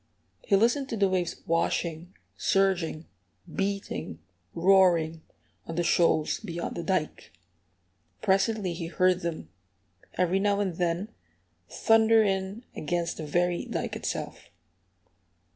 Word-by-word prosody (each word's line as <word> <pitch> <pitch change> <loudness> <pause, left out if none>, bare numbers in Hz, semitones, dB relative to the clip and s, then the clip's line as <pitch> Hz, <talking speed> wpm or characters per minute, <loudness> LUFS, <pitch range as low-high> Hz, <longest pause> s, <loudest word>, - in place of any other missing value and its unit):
He 200 - +2
listened 240 +7 +2
to 225 - -3
the 200 -1 +3
waves 185 -2 -2
washing, 165 +1 -1 0.2
surging, 180 -5 +1 0.5
beating, 200 - -3 0.4
roaring, 170 -3 +4 0.5
on 165 - -5
the 175 - 0
shoals 165 -2 +2
beyond 170 -5 -5
the 170 - -3
dike. 170 -2 -2 0.9
Presently 195 -1 +1
he 165 0 -5
heard 185 +1 +2
them, 165 - -5 0.7
every 180 +1 +2
now 200 0 +1
and 190 -5 -2
then, 175 +3 -1 0.6
thunder 225 0 +4
in 195 +3 -2
against 170 +2 -2
the 155 - -6
very 175 +3 +1
dike - - -3
itself. - - -5
180 Hz, 115 wpm, -27 LUFS, 170-195 Hz, 0.9 s, roaring